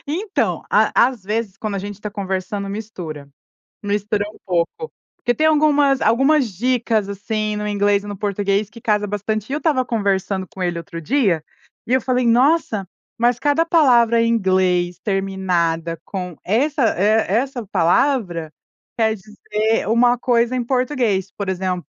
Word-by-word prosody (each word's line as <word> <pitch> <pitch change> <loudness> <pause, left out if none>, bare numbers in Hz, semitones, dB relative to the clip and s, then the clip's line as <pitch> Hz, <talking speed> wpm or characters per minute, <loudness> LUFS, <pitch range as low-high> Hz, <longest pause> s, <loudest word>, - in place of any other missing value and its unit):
Então, 375 +8 -1
à 245 - +4
às 245 -7 -9
vezes, 210 -1 -3
quando 215 -2 -4
a - - -2
gente 205 +1 -7
tá 210 0 -5
conversando, 195 0 -3
mistura. 180 -9 -7 0.6
Mistura 205 0 -1
um - - -18
pouco, 180 - -2 0.3
porque 245 - 0
tem 315 +3 +2
algumas 290 -3 +3
algumas 270 +3 +3
dicas 230 -2 0
assim, 210 +1 -2
no 210 0 -3
inglês 205 0 +1
e 205 - -9
no 205 -1 -6
português, 200 0 -1
que 230 +1 -14
casa 210 -1 +1
bastante. 210 +2 -3
E - - -3
eu 295 - 0
estava 290 -6 +1
conversando 195 -4 -1
com 190 - -8
ele 175 -1 -1
outro 165 0 -7
dia, 190 - +1 0.4
e 250 - 0
eu 260 - +3
falei: 250 0 0
"Nossa, 240 - +2 0.3
mas 240 +1 +2
cada 290 +4 +2
palavra 240 -8 +4
em 230 - +2
inglês 185 -4 +1
terminada 180 -5 -1
com 180 -4 -5
essa 270 - +1 0.2
e 215 +3 +3
essa 245 +1 -1
palavra, 175 - +1 0.5
quer 220 -1 +2
dizer 215 +2 -2
uma 240 +2 +3
coisa 240 0 +1
em 250 - -1
português. 240 -7 0
Por 200 -2 -5
exemplo, 185 -1 -2
210 Hz, 160 wpm, -20 LUFS, 190-245 Hz, 0.6 s, à